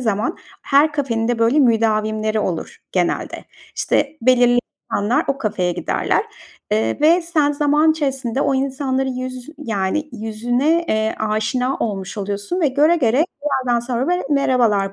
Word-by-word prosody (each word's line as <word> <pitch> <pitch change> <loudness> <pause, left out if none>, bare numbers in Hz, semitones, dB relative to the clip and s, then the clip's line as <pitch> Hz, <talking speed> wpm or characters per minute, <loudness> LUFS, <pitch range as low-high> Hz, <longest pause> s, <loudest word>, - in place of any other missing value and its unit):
zaman 220 -1 -1 0.3
her 290 +2 +3
kafenin 235 -6 -1
de, 240 - 0
böyle, 230 +6 +3
müdavimleri 215 -2 +1
olur 175 -5 -3 0.2
genelde. - - -1 0.3
İşte, 295 +2 0
belirli 245 -1 +4 0.3
insanlar 205 +4 +1
o 275 - 0
kafeye 185 -7 -1
giderler, 175 - 0 0.5
eee, 110 +1 0
ve 335 +3 +4
sen 310 -4 +1
zaman 295 +2 +3
içerisinde 270 -4 -2
o 270 - +1
insanların 265 -1 -1
yüz 255 +1 -6
yani, 225 +4 -2
yüzüne, 245 +9 0
eee, 220 0 0
aşina 220 +5 -1
olmuş 195 -2 -4
oluyorsun 205 - -3
ve 305 - +3
göre 300 +6 +3
göre 260 +2 +2 0.2
bir 295 - 0 0.2
yerden 240 -1 +2
sonra, 245 +4 -2
böyle, 360 0 +1
merhabalar 235 -8 +2
245 Hz, 145 wpm, -19 LUFS, 215-285 Hz, 0.5 s, belirli